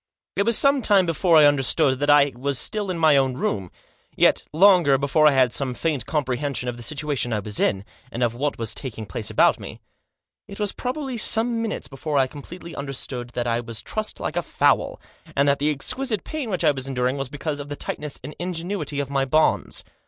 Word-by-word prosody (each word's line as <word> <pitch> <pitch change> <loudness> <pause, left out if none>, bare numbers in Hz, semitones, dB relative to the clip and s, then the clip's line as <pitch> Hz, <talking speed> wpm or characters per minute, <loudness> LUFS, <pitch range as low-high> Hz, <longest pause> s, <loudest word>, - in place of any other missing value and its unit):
It 200 - 0
was 230 - +5
some 275 -1 +4
time 200 -5 +4
before 165 0 +3
I 150 - +8
understood 140 -1 +2
that 145 +1 0
I 145 -1 +6
was 135 +2 -2
still 210 - -3
in 180 - -2
my 160 -3 +5
own 135 -2 +1
room; 100 -7 -2 0.5
yet, - - +4
longer 175 -5 +5
before 150 +3 +3
I - - +6
had 130 -3 +3
some 130 -3 -1
faint 150 -7 -2
comprehension 140 -3 -2
of 120 - -2
the 120 - -10
situation 145 -1 -2
I 110 - 0
was 105 0 -2
in, 95 0 +1 0.3
and 120 - -2
of 120 -1 +1
what 140 +4 -2
was 115 -2 -2
taking 115 -5 -5
place 95 - -5
about - - +3
me. - - -9 0.7
It 200 - -10
was 205 -1 0
probably 260 -1 -4
some 230 +1 +2
minutes 225 -2 -3
before 145 +2 -3
I 135 - +4
completely 165 +5 -10
understood 130 -3 -5
that 120 - -1
I 115 0 0
was 115 -1 -6
trussed 215 0 -3
like - - -4
a - - +1
fowl, - - +1 0.4
and 140 +1 +3
that 140 0 +2
the 145 +2 +1
exquisite 215 - -2
pain 305 -7 -5
which 185 -4 -1
I 155 - +5
was 135 -1 -5
enduring 130 0 -1
was 135 -2 -4
because 145 +1 -4
of 145 0 -7
the 145 - -4
tightness 150 0 -5
and 145 +3 -8
ingenuity 170 -4 -3
of 140 -1 -3
my 135 -1 +1
bonds. 155 +4 +1
145 Hz, 215 wpm, -23 LUFS, 130-175 Hz, 0.7 s, I